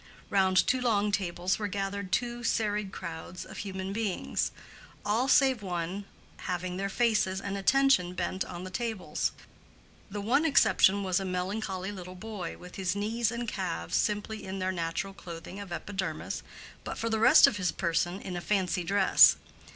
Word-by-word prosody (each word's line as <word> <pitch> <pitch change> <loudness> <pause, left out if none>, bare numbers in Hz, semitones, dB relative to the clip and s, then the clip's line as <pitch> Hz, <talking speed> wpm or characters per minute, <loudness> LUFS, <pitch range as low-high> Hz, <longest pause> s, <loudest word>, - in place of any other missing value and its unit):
Round 190 -2 +3
two 255 0 +1
long 210 -4 +2
tables 185 -1 -1
were 210 - -1
gathered 200 -1 -3
two 240 +1 -1
serried 210 -3 0
crowds 170 0 -7
of - - -10
human 190 -1 -4
beings, 210 -3 -1 0.6
all 225 +5 +1
save 265 -4 +4
one 180 +1 -3 0.3
having 180 0 -3
their 195 +1 -2
faces 210 -4 +1
and 200 0 -4
attention 200 -4 +3
bent 185 +1 -1
on 175 +1 -7
the 185 - -7
tables. 225 -6 -2 0.8
The 205 +1 -5
one 245 +9 +2
exception 200 -9 +4
was 185 -1 +1
a - - -3
melancholy 190 +1 -3
little 185 -2 -8
boy, 195 -2 -6
with 180 0 -11
his 185 -1 -1
knees 220 +3 0
and 235 0 -4
calves 185 -5 -3
simply 210 +1 -1
in 190 0 -5
their 185 0 -1
natural 170 +2 -3
clothing 175 +1 -9
of 200 -3 -8
epidermis, 190 +2 -4 0.4
but - - -5
for 230 - -2
the 220 -1 0
rest 240 +4 +8
of 205 - +1
his 185 -3 0
person 175 +1 0
in 185 - -5
a 175 - -3
fancy 185 -3 0
dress. 195 +2 +6
195 Hz, 165 wpm, -29 LUFS, 180-215 Hz, 0.8 s, rest